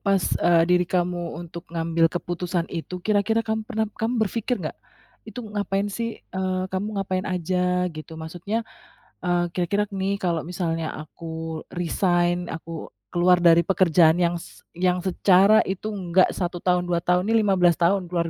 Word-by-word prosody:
pas, 195 -3 +1
eee, 170 -1 +5
diri 180 0 +2
kamu 175 -1 -1
untuk 170 0 -9
ngambil 165 0 +1
keputusan 175 0 -2
itu 175 +2 -6
kira-kira 215 +2 +2
kamu 220 0 -1
pernah 220 0 0 0.2
kamu 230 +3 0
berpikir 230 +4 -2
gak, - - -3 0.6
itu 245 - -7
ngapain 205 -1 -2
sih, 230 +2 -4
eee, 185 0 -1
kamu 205 +3 -2
ngapain 190 -1 -1
aja? 180 0 0
Gitu. 155 +1 -9
Maksudnya, 175 +8 -4 0.6
eee, 175 0 +1
kira-kira 195 +4 -1
nih 195 0 -2
kalau 170 -4 -1
misalnya 165 -2 -2
aku 160 +1 -7
resign, 175 0 +1
aku 165 0 -8 0.2
keluar 175 0 +3
dari 170 -1 +6
pekerjaan 170 -3 +4
yang 175 0 +2
se 170 - -12 0.2
yang 180 0 +2
secara 190 +2 +4
itu 195 +3 -3
enggak 185 -3 +2
1 175 -1 -3
tahun, 180 -1 +2
2 175 -1 0
tahun, 180 +1 +2
ini 225 +1 +3
15 185 -4 +4
tahun, 185 +2 +3
luar 170 -2 0
180 Hz, 155 wpm, -24 LUFS, 170-195 Hz, 0.6 s, dari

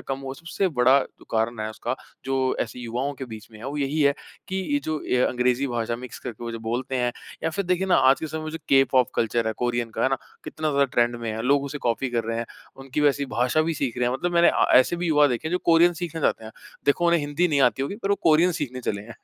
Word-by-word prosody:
कम 135 - -9
हुआ, 135 -1 -6
सबसे 175 +4 -2
बड़ा 130 -2 +4
जो - - -10
कारण 115 0 0
है 110 - -2
उसका 110 - -3 0.3
जो 135 - -1 0.3
ऐसे 120 - -4
युवाओं 125 +4 -3
के 135 - -6
बीच 110 -2 -9
में 110 - -12
है, 110 - -11
वो 140 +2 -4
यही 145 +2 -1
है 140 -1 +5 0.4
कि 190 - -3 0.2
ये 290 - +3
जो 155 -1 -2
ये 125 - +3
अंग्रेजी 125 +2 +1
भाषा 115 -2 -2
मिक्स 125 0 -9
करके 120 0 -7
वो 115 - -4
जो 115 - -5
बोलते 120 +4 -3
हैं 125 -1 0 0.3
या 160 - +1
फिर 200 +4 -2
देखिए 180 +1 0
ना 190 - +4
आज 135 - +2
के 160 - -3
समय 160 +1 -5
में 155 - -4
जो 160 - -6
के-पॉप 135 -2 +4
कल्चर 115 0 0
है, 110 - 0
कोरियन 120 0 -2
का - - -3
है - - +4
ना। 135 - +2 0.3
कितना 155 0 -3
ज़्यादा 140 -1 +3
ट्रेंड 120 0 +3
में 115 -1 -4
है, 110 +1 -4
लोग 140 +3 +2
उसे 145 +1 -5
कॉपी 125 +3 -1
कर 115 -2 -1
रहे 115 0 -2
हैं। 115 - -3 0.3
उनकी 135 +2 -4
वैसी 145 -1 +2
भाषा 125 +5 +1
भी 165 0 -1
सीख 135 -4 -2
रहे 120 0 +2
हैं, 125 - -1
मतलब 175 +7 -2
मैंने 170 0 +6
अ, - - +3
ऐसे 130 +7 +5
भी 175 0 -2
युवा 150 -2 +5
देखें 130 +3 -2
है, - - -5
जो 180 - +2
कोरियन 170 +1 +5
सीखना 165 -2 -4
चाहते 115 - 0
हैं। 110 - -9 0.3
देखो 170 +5 +3
उन्हें 170 -1 +4
हिंदी 145 +5 0
नहीं 145 -3 +2
आती 125 +4 -5
होगी 140 +9 -3
पर 195 - -1
वो - - +5
कोरियन 165 +3 +4
सीखने 140 -7 -4
चले 100 -4 -3
हैं। 115 +2 -11
135 Hz, 280 wpm, -24 LUFS, 120-155 Hz, 0.4 s, मैंने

